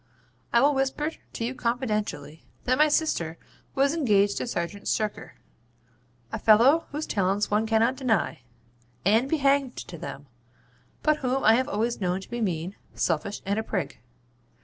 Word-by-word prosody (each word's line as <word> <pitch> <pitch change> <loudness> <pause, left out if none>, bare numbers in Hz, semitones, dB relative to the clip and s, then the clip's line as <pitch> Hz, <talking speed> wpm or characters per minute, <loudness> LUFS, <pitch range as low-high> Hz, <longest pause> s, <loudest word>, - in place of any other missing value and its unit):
'I 235 - +4
will 290 +2 +4
whisper 270 +3 -1 0.2
to 230 - -3
you 245 - -2
confidentially 215 - -2 0.2
that 255 +2 +1
my 305 - +6
sister 230 - 0 0.4
was 275 +1 +3
engaged 205 -10 +2
to - - -2
Serjeant 200 -1 -4
Shirker 215 -1 -2 1.0
a - - -3
fellow 245 +9 +5
whose 300 +2 -3
talents 200 +1 0
one 215 +2 +2
cannot 225 +4 +2
deny, 240 -8 0 0.6
and 225 +7 +3
be 320 - +2
hanged 275 -2 +2
to - - -8
them, - - -7 0.8
but 305 0 +3
whom 260 0 -1
I 220 - +7
have 255 +3 +1
always 225 +2 -1
known 180 0 0
to - - -13
be 240 0 -3
mean, 180 -2 -2 0.2
selfish, 175 +5 -1
and 200 +2 0
a - - -2
prig. 185 -9 -3
225 Hz, 160 wpm, -26 LUFS, 200-270 Hz, 1.0 s, I